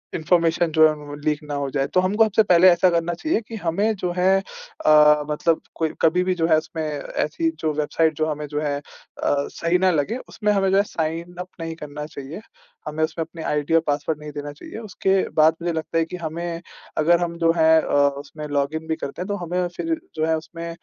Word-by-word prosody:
Information 165 0 +2
जो 160 0 +6
है 155 - 0
व 150 -1 -11
वो 145 - -7
लीक 150 -1 +1
ना 150 -1 -6
हो 140 -1 -2
जाए। 135 0 -1
तो 185 - +1
हमको 205 +4 +3
सबसे 220 0 +3
पहले 180 -2 +6
ऐसा 175 +1 +4
करना 170 0 0
चाहिए 310 - 0
की 230 - -7
हमें 200 +3 0
जो 180 -2 -2
है 190 +2 +4 0.5
अ, 150 -1 +6
मतलब 160 +2 +1
कोई 160 -1 0
कभी 175 +3 +3
भी 185 0 +1
जो 165 -2 +1
है 160 -2 +5
उसमें 160 +1 -4
ऐसी 155 +2 -2
जो 155 - +1
वेबसाइट 155 +2 +1
जो 155 - 0
हमें 150 -1 -3
जो 150 +1 -3
है 145 -2 -1
अ, - - -16 0.5
सही 165 +5 0
ना 185 0 +3
लगे 165 - 0
उसमें 210 -1 0
हमें 195 -2 +2
जो 195 - +4
है 200 - +5
साइन 165 -1 -4
अप 180 - -5
नहीं 165 0 -4
करना 150 -1 -7
चाहिए। 150 +4 -8 0.5
हमें 155 +1 -1
उसमें 160 +1 -1
अपने 165 0 -9
आईडी 150 +1 -1
और 165 - +5
पासवर्ड 145 +1 -1
नहीं 150 0 -8
देना 145 0 -6
चाहिए। 145 - -10
उसके 195 -3 0 0.2
बाद 155 +1 +6
मुझे 170 0 -1
लगता 160 +1 -3
है 165 - +2
कि 180 - -7
हमें 165 +1 -4 0.4
अगर 170 +3 +4
हम 170 -1 -4
जो 165 -1 +3
है 160 0 +5
अ, - - -5
उसमें 145 +2 0
लॉगिन 145 +2 -2
भी 160 - 0
करते 140 +2 -6
हैं 185 - -4
तो 205 - -1
हमें 180 +1 -1
फ़िर 330 0 -1 0.2
जो 155 0 0
है 160 0 +1
उसमें 165 +1 -7
160 Hz, 230 wpm, -22 LUFS, 150-175 Hz, 0.5 s, जो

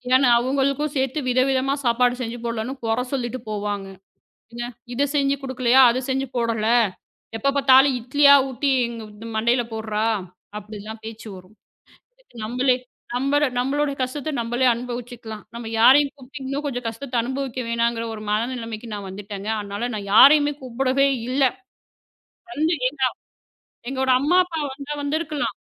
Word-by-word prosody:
ஏன்னா, 260 0 +5
அவங்களுக்கும் 275 +3 0
சேர்த்து 265 +2 0
வித, 250 +1 +2
விதமா 270 +1 +1
சாப்பாடு 245 +1 +3
செஞ்சு 240 0 -4
போடலன்னு 230 +2 -3
குறை 225 +2 0
சொல்லிட்டு 255 -1 -2
போவாங்க. 205 -2 -3 0.7
"எங்க 240 0 -5 0.3
இதைச் 280 +3 0
செஞ்சு 280 -1 +2
குடுக்கலையா? 260 -1 +3
அதை 250 +2 -1
செஞ்சு 270 +1 0
போடல. 230 -2 0 0.7
எப்ப 275 +5 +1
பாத்தாலும் 270 0 +6
இட்லியா 280 +4 +5
ஊட்டி 275 +2 -1 0.2
எங்க 230 -1 -7 0.2
து 230 - -8
மண்டைல 235 +2 +2
போடுறா" 220 -1 -3 0.6
அப்படில்லாம் 215 +1 -9
பேச்சு 225 0 -8
வரும். 185 +4 -16 0.9
நம்மளே 250 +3 +2 0.4
நம்மட 275 +4 +2
நம்மளோடைய 280 +3 0
கஷ்டத்த 280 +4 -3
நம்மளே 240 +2 +1
அனுபவிச்சுக்கலாம். 240 -2 -7
நம்ம 235 0 -7
யாரையும் 275 +4 +6
கூப்பிட்டு 275 +1 -11
இன்னும் 275 +2 -3
கொஞ்சம் 245 -4 -4
கஷ்டத்தை 245 +3 -6
அனுபவிக்க 260 0 -4
வேணாங்கிற 235 0 0
ஒரு 215 - -7
மனநிலமைக்கு 230 0 -3
நான் 200 -2 -6
வந்துட்டேங்க. 200 +1 -7
அதனால 205 +4 -4
நான் 200 -1 -6
யாரையுமே 290 +5 +7
கூப்பிடவே 260 +2 +1 0.2
இல்ல. 270 +2 +1 1.1
வந்து 315 +2 +1 0.2
எங்க 275 +1 -12
அப் - - -17 0.8
எங்கோட 265 -1 0
அம்மா, 325 +6 +2
அப்பா 335 -3 -5
வந்தா 280 +2 -7
வந்திருந்திருக்கலாம். 300 0 -2
250 Hz, 140 wpm, -22 LUFS, 230-275 Hz, 1.1 s, யாரையுமே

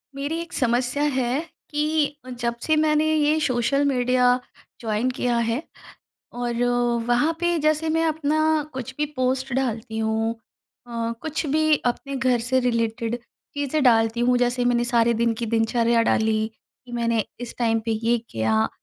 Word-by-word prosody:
मेरी 285 +4 -3
एक 335 - -9
समस्या 250 +3 0
है, 265 -1 0 0.3
कि 300 -1 0 0.2
जब 235 -1 -1
से 315 - +2
मैंने 305 0 +3
ये 305 +1 +2
सोशल 265 0 +1
मीडिया 250 -2 +3 0.4
जॉइन 225 +2 0
किया 245 -2 0
है, 230 +3 0 0.7
और 240 0 -2 0.4
वहाँ 245 +7 +2
पे 345 -1 +1
जैसे 310 +1 +1
मैं 325 +1 +1
अपना 310 -1 0 0.3
कुछ 260 0 -6
भी 300 - +1
पोस्ट 260 +1 0
डालती 230 -4 -2
हूँ, 220 0 0 0.5
अ, 230 -1 -3
कुछ 315 +1 -3
भी 310 +2 +3
अपने 270 +3 -2
घर 255 -1 +2
से 255 +3 +1
रिलेटेड 230 -1 -1 0.4
चीज़ें 285 +1 -1
डालती 225 -2 +3
हूँ। 245 +1 +3
जैसे 245 0 +1
मैंने 240 -1 +2
सारे 235 -1 +2
दिन 230 +1 +1
की 230 +1 -4
दिनचर्या 230 +1 +2
डाली, 220 -1 +1 0.4
कि 240 - -12
मैंने 230 -2 0 0.2
इस 245 -1 -6
टाइम 225 -2 +2
पे 230 - -2
ये 235 +1 +3
किया, 110 0 +1
245 Hz, 155 wpm, -23 LUFS, 230-285 Hz, 0.7 s, मैंने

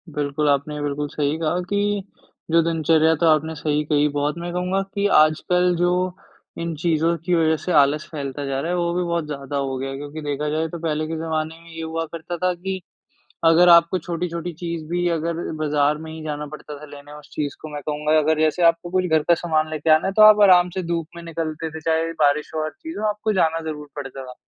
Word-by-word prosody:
बिल्कुल, 145 0 0
आपने 145 +1 0
बिल्कुल 145 0 -2
सही 145 +1 -1
कहा 165 +2 0
कि, 205 0 0 0.5
जो 165 0 +5
दिनचर्या 160 -1 +3
तो 170 - 0
आपने 160 +1 +2
सही 150 -1 0
कही 150 -1 +2
बहुत 145 +3 -1
मैं 175 +1 -5
कहूँगा 180 +2 0
कि 200 0 0 0.2
आजकल 180 +3 +2
जो 175 0 +3 0.7
इन 170 -1 -3
चीज़ों 165 +1 +1
की 180 - +1
वज़ह 160 -1 +3
से 180 - -2
आलस 150 0 +3
फैलता 140 -1 -5
जा 135 0 -2
रहा 170 - -2
है, 180 - 0
वो 170 -1 0
भी 180 +1 0
बहुत 170 -2 -1
ज़्यादा 145 -1 -5
हो 135 -1 -2
गया 135 +1 -4
है, 135 - -5
क्योंकि 145 +2 -7
देखा 145 0 -2
जाए 160 +2 -1
तो 170 +1 -7
पहले 155 -1 -2
के 165 - -4
ज़माने 160 0 -3
में 170 - -15
ये 165 0 -7
हुआ 165 0 -3
करता 170 +1 -5
था 180 +2 +1
कि 190 +2 -5 0.6
अगर 165 +2 +6
आपको 170 +1 +6
छोटी-छोटी 170 0 -4
चीज़ 170 0 -5
भी 175 +1 0
अगर 170 0 -1 0.2
बाज़ार 150 -1 +1
में 160 0 -8
ही 160 0 -8
जाना 150 -1 -4
पड़ता 150 0 -9
था 150 - -11
लेने 145 0 -12
उस 150 - -16
चीज़ 145 -2 -3
को। 155 - -8
मैं 145 - -4
कहूँगा 150 +1 0
अगर 155 +1 +2
जैसे 155 +3 +1
आपको 170 +1 +3
कुछ 185 0 +1
घर 160 -3 +2
का 170 - +7
सामान 155 -2 0
ले 155 - -3
के 155 +2 0
आना 155 +2 +5
है 190 - 0
तो 215 - +5
आप 215 0 +8
आराम 180 -3 +6
से 185 - -2
धूप 170 -1 -2
में 170 - -8
निकलते 160 -1 -4
थे, 160 0 -8
चाहे 165 +1 0
बारिश 145 +1 +2
हो, 155 - -1
हर 155 - -3
चीज़ 325 - -9
हो, 215 - -1
आपको 210 +1 -1
जाना 165 -4 +1
ज़रूर 150 -1 -7
पड़ता 135 -2 -6
था। 125 0 -10
160 Hz, 235 wpm, -22 LUFS, 150-170 Hz, 0.7 s, आप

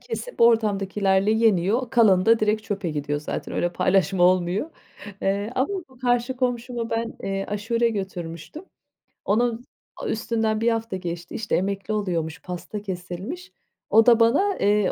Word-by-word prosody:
kesip - - -7
ortamdakilerle 200 -3 +3
yeniyor. 220 +2 +2
Kalanı 200 -5 +4
da 230 0 +6
direkt 215 0 +1
çöpe 200 -5 -3
gidiyor 145 0 -2
zaten - - -5
öyle 175 - 0
paylaşma 185 0 +2
olmuyor, 185 - +2 0.5
eee, 200 +4 -1
ama 260 - +1 0.2
bu 260 -1 -20
karşı 245 0 0
komşuma 245 -2 -2
ben, 230 0 -2
eee, 195 0 -2
aşure 230 +3 0
götürmüştüm. 190 - -6 0.6
Onun 235 +3 +1 0.3
a - - -6
üstünden 220 -1 -1
1 235 - +3
hafta 225 -3 -2
geçti 175 -1 -6
işte 220 -1 -1
emekli 195 +3 -2
oluyormuş, 170 -7 -2
pasta 180 +3 -6
kesilmiş. 195 - -6 0.4
O 225 0 +6
da 235 -1 +6
bana, 380 - +3
eee, 205 -1 +2
210 Hz, 145 wpm, -24 LUFS, 185-230 Hz, 0.6 s, da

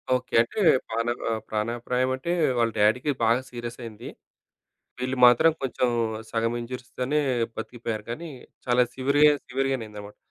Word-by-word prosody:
Okay. 125 0 -5
అంటే 120 - -4 0.3
ప్రాణ 115 +1 -2 0.2
ఆహ్, 110 -1 -1
ప్రాణాప్రాయం 120 +4 -1
అంటే 130 +6 -4 0.3
వాళ్ళ 115 -1 +2
డాడీ‌కి 120 +8 +3
బాగా 115 +3 +3
సీరియస్ 120 -1 -7
అయింది. 115 0 -8 0.9
వీళ్ళు 130 +1 -2
మాత్రం 125 +7 +6
కొంచెం 130 -1 0 0.4
సగం 115 +1 0
ఇన్‌జ్యూరీస్‌తోనే 125 +3 -3 0.4
బతికిపోయారు. 115 -1 -5
కానీ 165 +8 -6 0.4
చాలా 125 0 +4
సివేర్‌ 140 +3 +1 0.2
సివియర్‌గానే 135 -2 -1
అయిందనమాట. 105 -1 -10
120 Hz, 130 wpm, -25 LUFS, 115-130 Hz, 0.9 s, మాత్రం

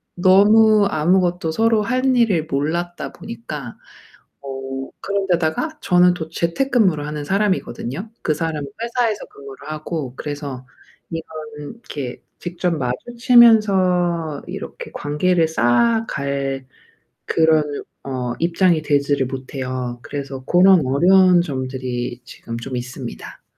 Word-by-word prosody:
너무 205 +3 +5
아무것도 175 0 +1
서로 225 +3 +2
할 255 +3 +1
일을 195 -10 +2
몰랐다 170 +5 -2
보니까 120 +2 -8 0.6
어 135 -1 -6
그런 200 -1 -2
데다가 175 - 0
저는 180 -1 +4
또 160 -2 -6
재택근무를 170 - +1
하는 150 -1 -5
사람이거든요. 190 - -1
그 155 - +1
사람은 155 -2 -3
회사에서 235 -2 -1
근무를 140 +1 -12
하고 155 -4 -5
그래서 145 -3 -6 0.5
이거는 155 -2 -7
이렇게 145 - -7 0.2
직접 175 0 -2
마주치면서 185 - +3
이렇게 - - -7
관계를 165 +3 +1
쌓아갈 140 - 0 0.6
그런 160 -1 +3 0.4
어 125 -3 -3
입장이 170 -1 +2
되지를 140 -2 +1
못해요. 130 -2 -5
그래서 135 -2 -6
고런 180 -4 +5
어려운 180 +6 +5
점들이 130 -4 -4
지금 115 -2 -8
좀 125 +2 -6
있습니다. 120 - -8
160 Hz, 270 characters per minute, -20 LUFS, 135-190 Hz, 0.6 s, 너무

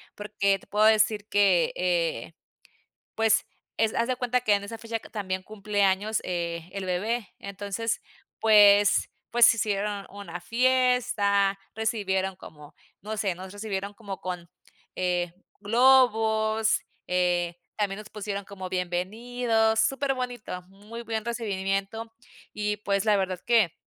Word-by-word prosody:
porque, 200 -2 0
te - - -21
puedo 210 +1 +2
decir 215 -1 +3
que, 195 -4 +3
eh, 170 -6 -1 0.8
pues, 225 -1 +3 0.3
es 220 -1 +2
haz 230 - +1
de 255 - 0
cuenta 250 0 0
que 215 -4 +3
en 200 - +1
esa 225 +3 -7
fecha, 230 0 -4
que - - -14
también 190 -3 -3
cumple 210 -1 -2
años, 200 +3 +1
eh, 170 -1 -3
el 195 -1 -5
bebé, 210 +4 -2
entonces, 200 +3 -3 0.4
pues 205 -2 +6 0.2
pues, 240 -1 +7
hicieron 205 -2 -2
una 200 -4 -8
fiesta, 230 -3 +2 0.2
recibieron 190 -4 -1
como 150 -4 -13 0.3
no 215 +2 -5
sé, 195 -4 0
nos 185 +1 -9
recibieron 205 -1 -4
como 200 -3 -8
con, 180 -2 -5 0.5
eh, 175 -1 -1 0.3
globos, 220 -2 +3 0.3
eh, 175 -1 +1 0.2
también 200 -2 -1
nos 215 - -10
pusieron 200 -1 -5
como 190 -2 -8
bienvenidos, 220 +5 0
superbonito, 250 -6 -2
muy 205 +5 -11
buen 225 -1 -4
recibimiento, 215 -1 -3 0.4
y 210 0 -1
pues, 200 -1 0
la 210 - +4
verdad, 185 -2 -1
que 225 -8 +3
205 Hz, 135 wpm, -27 LUFS, 190-225 Hz, 0.8 s, pues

